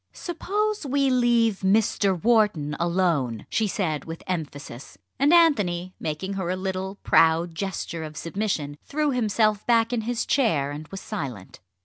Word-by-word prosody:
"Suppose 415 +5 -2
we 275 -1 +1
leave 235 -4 +3
Mr. 195 -1 +2
Wharton 205 -9 +2
alone?" 170 - 0
she 220 - +1
said 165 -7 -2
with 165 0 -8
emphasis, 145 - -6 0.2
and 280 +3 +4
Anthony, 200 - +3
making 160 +6 -3
her 190 -3 -3
a 185 - 0
little 190 +1 -3
proud 165 +1 +3
gesture 170 -2 -4
of 155 -1 -8
submission, 165 -6 -3
threw 300 0 -1
himself 215 -3 +1
back 230 0 +3
in 235 - 0
his 235 +1 -2
chair, 160 - +1
and 150 +1 -7
was 195 +3 -8
silent. 130 - -6
190 Hz, 145 wpm, -25 LUFS, 160-230 Hz, 0.2 s, and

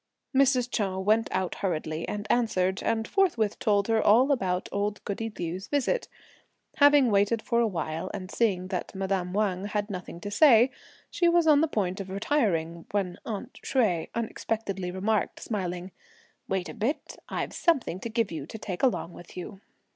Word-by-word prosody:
Mrs. 265 -2 +4
Chou 195 -4 -1
went 215 +4 +2
out 185 -1 -1
hurriedly 160 -3 -2
and 205 0 -4
answered; 190 -5 +1
and 225 0 0
forthwith 245 - +1
told 205 -4 +2
her 225 -1 +3
all 250 +7 +5
about 185 -8 0
old 205 +1 -1
goody 225 +2 -3
Liu's 180 +3 -4
visit. 290 - 0 0.7
Having 285 -4 +6
waited 205 +3 +3
for 235 -2 +1
a 235 - +3
while, 165 -1 -3
and 190 -1 -6
seeing 190 -6 0
that 190 +1 -4
madame 190 -2 -1
Wang 195 -1 0
had 205 0 -2
nothing 180 -2 -6
to 205 - -5
say, 250 -1 +6 0.4
she 345 - +3
was 340 -1 +4
on 300 -2 +6
the 325 - +3
point 195 - -1
of 195 -1 -6
retiring, 190 - 0
when 190 -3 -2
"aunt" 210 -4 -6
Hsueh 195 - +1
unexpectedly 215 -4 -3
remarked 200 +3 -1
smiling: 180 -3 -4 0.6
"Wait 190 -1 -1
a - - -7
bit! 255 +7 -3
I've - - -3
something 275 - +1
to 230 - -5
give 230 -2 0
you 155 -3 -5
to 220 - -7
take 190 -4 -5
along 245 -9 +1
with 175 - -13
you." 195 +2 -7
205 Hz, 170 wpm, -27 LUFS, 185-230 Hz, 0.7 s, Having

